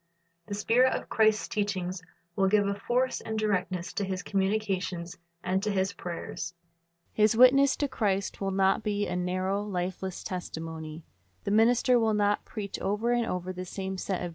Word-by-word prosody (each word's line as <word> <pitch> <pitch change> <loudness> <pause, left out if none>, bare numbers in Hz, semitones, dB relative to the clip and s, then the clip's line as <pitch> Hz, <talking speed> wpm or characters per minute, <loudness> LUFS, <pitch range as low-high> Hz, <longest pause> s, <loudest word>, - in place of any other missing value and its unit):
The 200 - -3
spirit 245 +5 +3
of - - -5
Christ's 220 -1 +3
teaching 190 -4 -1 0.4
will 195 -1 +3
give 205 +1 +3
a 200 - +1
force 250 +5 0
and 220 0 -4
directness 185 -4 -1
to 205 - -1
his 190 -2 -3
communications 190 -3 -1 0.3
and 185 +1 +1
to 210 - -1
his 195 0 0
prayers. 175 -1 -6 0.6
His 215 +1 +3
witness 265 +2 +7
to 290 - 0
Christ 200 -7 -1
will 195 - 0
not 195 +2 +2
be 205 -1 -1
a 180 - -3
narrow, 185 +2 -1
lifeless 190 -2 -4
testimony. 160 -3 -6 0.4
The - - -2
minister 240 +3 +4
will 220 -2 +2
not 205 0 +1
preach 205 -3 -5
over 210 +5 0
and 240 -1 +1
over 180 0 -3
the 185 0 -5
same 190 +1 -5
set 190 -1 -2
discourses. 175 - -3
195 Hz, 170 wpm, -29 LUFS, 185-215 Hz, 0.6 s, witness